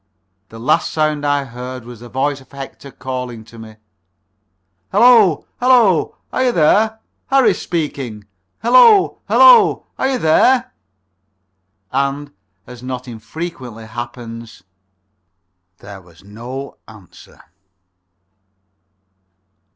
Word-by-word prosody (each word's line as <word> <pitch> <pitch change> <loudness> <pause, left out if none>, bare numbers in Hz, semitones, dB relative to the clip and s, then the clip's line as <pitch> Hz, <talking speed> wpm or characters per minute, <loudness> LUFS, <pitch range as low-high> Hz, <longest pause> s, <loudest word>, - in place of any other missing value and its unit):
The 115 - -12
last 150 +8 +1
sound 155 -2 -1
I 145 -1 +1
heard 125 0 -8
was 120 -2 -11
the 120 +1 -12
voice 135 +3 -2
of 130 - -21
Hector 140 0 -10
calling 125 -3 -6
to 115 0 -15
me: 110 -1 -12 1.2
"Hullo, 225 - +5
hullo! 240 -10 +3 0.2
Are 260 - +1
you 250 - +3
there? 215 +6 +2 0.3
Harris 255 -8 +2
speaking.... 135 -10 -4 0.4
Hullo, 370 - +5
hullo.... - - +6
Are 265 - +1
you 265 - 0
there?" 250 +8 +2 1.2
And, 140 +2 -2 0.3
as 125 -1 -12
not 125 0 -6
infrequently 120 0 -8
happens, 115 -1 -9 1.1
there 100 -1 -12
was 85 -1 -21
no 120 +7 -8
answer. 105 -5 -17
135 Hz, 105 wpm, -17 LUFS, 115-180 Hz, 1.2 s, hullo